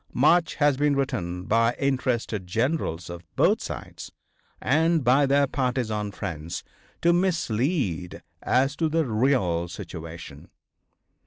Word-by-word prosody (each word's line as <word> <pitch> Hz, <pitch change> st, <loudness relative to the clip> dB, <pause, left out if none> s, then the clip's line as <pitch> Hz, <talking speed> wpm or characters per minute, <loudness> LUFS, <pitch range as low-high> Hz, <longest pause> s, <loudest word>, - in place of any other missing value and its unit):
Much 165 Hz, +5 st, +3 dB
has 145 Hz, -3 st, +3 dB
been 145 Hz, 0 st, +2 dB
written 90 Hz, -10 st, -2 dB
by 115 Hz, +4 st, +2 dB
interested 125 Hz, -7 st, -1 dB
generals 110 Hz, -, -1 dB
of 85 Hz, 0 st, -8 dB
both -, -, +3 dB
sides, -, -, -7 dB, 0.5 s
and 160 Hz, +2 st, +2 dB
by 135 Hz, +3 st, +4 dB
their 140 Hz, +1 st, +4 dB
partisan 120 Hz, -6 st, -1 dB
friends, 85 Hz, -5 st, -5 dB, 0.4 s
to 170 Hz, +1 st, +5 dB
mislead 140 Hz, -, -1 dB, 0.2 s
as 135 Hz, +3 st, +2 dB
to 160 Hz, 0 st, 0 dB
the 160 Hz, 0 st, +1 dB
real 110 Hz, -8 st, +1 dB
situation. 80 Hz, -3 st, -9 dB
125 Hz, 115 wpm, -25 LUFS, 90-145 Hz, 0.5 s, to